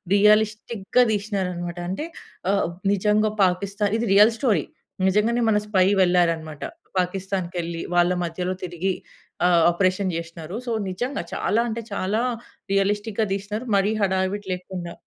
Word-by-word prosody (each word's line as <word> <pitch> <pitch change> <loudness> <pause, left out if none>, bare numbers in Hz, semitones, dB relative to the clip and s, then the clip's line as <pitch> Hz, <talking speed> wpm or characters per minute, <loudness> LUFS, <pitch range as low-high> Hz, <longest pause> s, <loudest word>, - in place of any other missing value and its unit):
రియలిస్టిక్‌గా 215 +2 +3
తీసినారన్నమాట. 185 -4 -2
అంటే 295 - -3 0.5
ఆహ్, 200 - +1 0.3
నిజంగా 210 +2 +2
పాకిస్థాన్, 200 +3 -1
ఇది 235 - -1
రియల్ 210 +3 +7
స్టోరీ, 210 - +2 0.4
నిజంగానే 230 +5 +2
మన 210 - +3
స్పై 190 -3 +3 0.2
వెళ్లారన్నమాట. 165 -4 +1 0.4
పాకిస్థాన్‌కెళ్లి 180 -2 -3
వాళ్ళ 175 +1 +4
మధ్యలో 180 +2 -3
తిరిగి 180 +2 -2 0.5
ఆ - - +6 0.2
ఆపరేషన్ 185 +1 +1
చేసినా‌రు. 165 +2 -7
సో - - -1 0.2
నిజంగా 245 +9 -3
చాలా, 230 +2 +1
అంటే 230 +1 -3
చాలా 200 +4 0 0.5
రియలిస్టిక్‌‌‌‌‌‌‌‌‌‌‌గా 205 +2 +1
తీసినరు 210 +5 -5
మరీ 195 +2 +2
హడావిడి 190 +1 0
లేకుండా. 180 -1 -7
195 Hz, 120 wpm, -24 LUFS, 180-210 Hz, 0.5 s, రియల్